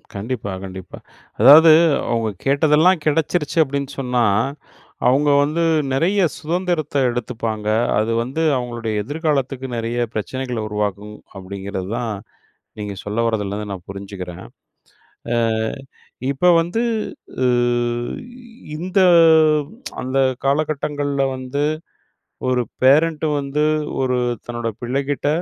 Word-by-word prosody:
கண்டிப்பா, 105 -1 -4
கண்டிப்பா. 95 -1 -9 0.4
அதாவது, 155 +6 +9 0.4
"அவங்க 115 -2 0 0.2
கேட்டதெல்லாம் 155 +5 +4
கெடைச்சிருச்சு 155 +1 0
அப்படீன்னு 140 0 -4
சொன்னா, 125 -2 +1 0.8
அவங்க 145 +3 +3
வந்து 160 +3 0 0.3
நெறைய 185 +8 +2 0.2
சுதந்திரத்தை 165 -3 -1
எடுத்துப்பாங்க. 115 -3 -4 0.3
அது 110 +2 0
வந்து 135 +7 -4 0.2
அவங்களுடைய 120 -3 -4
எதிர்காலத்துக்கு 140 -2 -2
நெறைய 115 +1 -3 0.2
பிரச்சனைகளை 125 +1 -3
உருவாக்கும்." 105 0 -3 0.2
அப்படீங்கிறது 95 0 -6
தான், 115 -3 -2 0.7
நீங்க 105 -1 -4
சொல்ல 105 +3 -3
வரதுலேந்து 105 -1 -2
நான் 90 -2 -10
புரிஞ்சுக்கிறேன். 95 -3 -8 0.9
அ - - +2 1.0
இப்ப 140 +6 0
வந்து 175 +8 -1 0.6
அ - - +4 1.3
இந்த 185 +4 0 1.0
அந்த 130 +2 -2 0.3
காலகட்டங்கள்ல 145 -1 0
வந்து 130 +3 -3 0.9
ஒரு 125 -1 +2 0.2
பேரன்ட் 155 +4 +4
வந்து 140 +2 -1 0.4
ஒரு 125 -1 +1 0.3
தன்னோட 120 -1 -3
பிள்ளைகிட்ட 140 +3 -1
130 Hz, 95 wpm, -20 LUFS, 110-150 Hz, 1.3 s, அதாவது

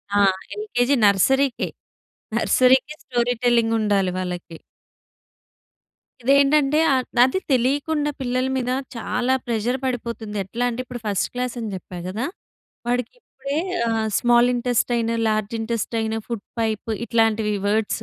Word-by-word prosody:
ఆ! - - +4 0.4
ఎల్‌కేజీ, 280 - +1
నర్సరీ‌కే, 265 +7 +3 0.7
నర్సరీ‌కి 260 +3 +3
story 245 -1 0
telling 235 -2 +3
ఉండాలి 200 -3 +2
వాళ్ళకి. 180 -2 -5 1.7
ఇదేంటంటే 280 +3 +4 0.2
ఆహ్, 260 -1 +2 0.2
అదే 260 +9 +2
తెలియకుండా 290 +4 +1
పిల్లల 255 0 0
మీద 250 -1 -2 0.3
చాలా 245 +2 0
ప్రెషర్ 235 +2 0
పడిపోతుంది. 235 -4 -4
ఎట్లా 235 +5 -3
అంటే 240 +2 -3
ఇప్పుడు 245 -1 -7
ఫస్ట్ 200 -2 0
క్లాస్ 250 0 -3
అని 225 -2 -4
చెప్పా 180 -1 -9
గదా! 215 +7 -3 0.6
వాడికి 245 -1 -1
ఇప్పుడే 275 -3 -6 0.3
ఆహ్, 225 -1 0
small 240 0 +4
intestine, 240 -1 0 0.2
large 215 0 -1
intestine, 225 0 -2
food 230 -4 -5 0.2
pipe 220 0 -2
ఇట్లాంటివి 220 -2 +1
వర్డ్స్. 220 +1 0
240 Hz, 120 wpm, -22 LUFS, 220-255 Hz, 1.7 s, ఆ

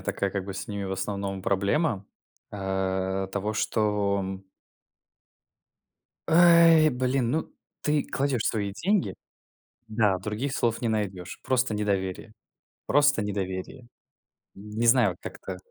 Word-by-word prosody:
такая 100 -1 -2
как 100 -2 -3
бы 95 - -5
с 95 0 -5
ними 100 -1 -4
в 95 - -3
основном 95 0 -3
проблема, 100 - 0 0.4
э, 95 -1 -2
того 105 +2 -2
что 105 -2 0
м 95 0 -6 1.8
Эй, 165 -2 +7
блин, 125 -1 0
ну 160 +3 -2 0.3
ты 150 -1 +2
кладешь 135 -4 -1
свои 100 -3 -1
деньги, 190 - 0 0.7
да, 105 -4 +2
других 110 +8 -3
слов 115 0 0
не 120 - +1
найдешь. 95 -5 -3
Просто 130 -2 +1
недоверие. 100 0 -2 0.6
Просто 145 -5 +4
недоверие. 100 +4 -4 0.7
Не 105 +4 -3
знаю 115 -7 +4
как-то 95 -1 -7
105 Hz, 120 wpm, -26 LUFS, 95-125 Hz, 1.8 s, Эй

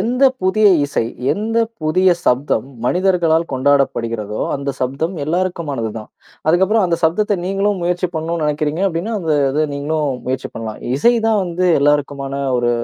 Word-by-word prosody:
எந்த 245 +6 -1 0.2
புதிய 210 +3 +3 0.2
இசை, 140 -5 -1 0.3
எந்த 225 +2 -1 0.2
புதிய 180 +3 +3
சப்தம், 130 -1 +1 0.2
மனிதர்களால் 175 -2 +2
கொண்டாடப்படுகிறதோ, 115 -6 0 0.2
அந்த 140 0 -3
சப்தம் 140 +8 -2
எல்லாருக்குமானது 160 -8 -2
தான். 110 - -10 0.4
அதுக்கப்பறம் 190 +4 +3
அந்த 170 -1 0
சப்தத்தை 205 +5 +1
நீங்களும் 195 0 0
முயற்சி 175 +1 0
பண்ணணும்னு 160 0 -2
நினைக்கிறீங்க 150 +4 -1
அப்படின்னா, 185 +7 -3
அந்த 160 -3 0 0.2
இதை 150 +3 +1
நீங்களும் 150 0 -1 0.2
முயற்சி 130 0 -3
பண்ணலாம். 110 -1 -6 0.2
இசை 240 +9 +4
தான் 215 -2 +2
வந்து 180 +1 -1
எல்லாருக்குமான 145 -1 0 0.3
ஒரு 120 0 +1
160 Hz, 140 wpm, -18 LUFS, 140-185 Hz, 0.4 s, இசை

